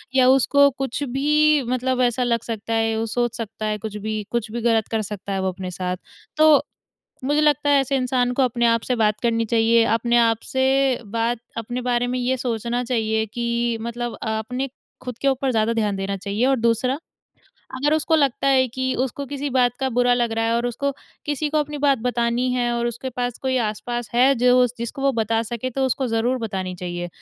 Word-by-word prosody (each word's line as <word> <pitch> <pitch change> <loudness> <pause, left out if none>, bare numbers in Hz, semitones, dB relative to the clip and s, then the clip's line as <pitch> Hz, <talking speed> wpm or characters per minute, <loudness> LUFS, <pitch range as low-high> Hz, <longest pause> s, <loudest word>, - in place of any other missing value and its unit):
या 255 -1 +5
उसको 280 +2 +5
कुछ 270 +1 -3
भी 300 +3 +3
मतलब 255 +1 -1
ऐसा 245 0 +2
लग 235 -2 +1
सकता 225 0 -4
है 225 0 +1
वो 225 - -1
सोच 240 +1 -1
सकता 220 -1 -5
है 215 0 -1
कुछ 210 0 -6
भी, 215 0 -3
कुछ 235 -2 -1
भी 235 +1 -4
गलत 225 -2 +2
कर 225 -1 -1
सकता 200 -1 -5
है 190 - -1
वो 190 - -1
अपने 185 0 -6
साथ। 180 +1 -3 0.4
तो 310 -2 +6 0.6
मुझे 295 +3 +2
लगता 295 -1 +2
है 285 -1 +5
ऐसे 270 +1 -1
इंसान 255 -1 +1
को 265 - +2
अपने 240 -1 +1
आप 230 -1 +2
से 250 - +1
बात 215 -2 +1
करनी 230 -1 +1
चाहिए, 230 +1 +3
अपने 235 +2 +2
आप 230 -1 +4 0.2
से 265 0 +2
बात 230 +2 -1 0.2
अपने 240 +3 -4
बारे 245 0 0
में 250 0 -2
ये 255 +1 0
सोचना 240 0 -2
चाहिए 220 -3 0
कि 235 +1 -1
मतलब 235 +1 -4
अ, - - -4
अपने 250 +5 -4 0.3
खुद 250 -2 -6
के 275 - -1
ऊपर 270 0 +1
ज़्यादा 225 0 +1
ध्यान 210 -3 0
देना 195 0 -3
चाहिए 205 +5 -1
और 270 0 +3
दूसरा, 235 +5 +1 0.8
अगर 295 +4 +1
उसको 315 +1 +1
लगता 275 -2 +1
है 260 -1 +4
कि 260 +2 -2
उसको 280 +2 -5
किसी 285 +1 -4
बात 250 -2 +3
का 265 - +1
बुरा 245 0 +3
लग 240 -2 0
रहा 225 0 0
है 230 - +1
और 240 +1 0
उसको 280 +4 -1 0.4
किसी 295 +1 -1
को 310 - +1
अपनी 295 0 -2
बात 280 -3 +3
बतानी 240 +1 0
है 245 -1 0
और 235 0 -1
उसके 240 +3 -4
पास 245 -1 -3
कोई 260 -1 0
आस-पास 235 +1 -3
है 260 +3 +5
जो 250 +1 +4
जिसको 235 +4 -5
वो 275 0 +3
बता 225 0 0
सके 235 +3 -4
तो 265 +2 -1
उसको 260 +1 -1
ज़रूर 235 +3 0
बतानी 190 -5 -4
चाहिए। 175 0 -5
240 Hz, 215 wpm, -22 LUFS, 225-260 Hz, 0.8 s, तो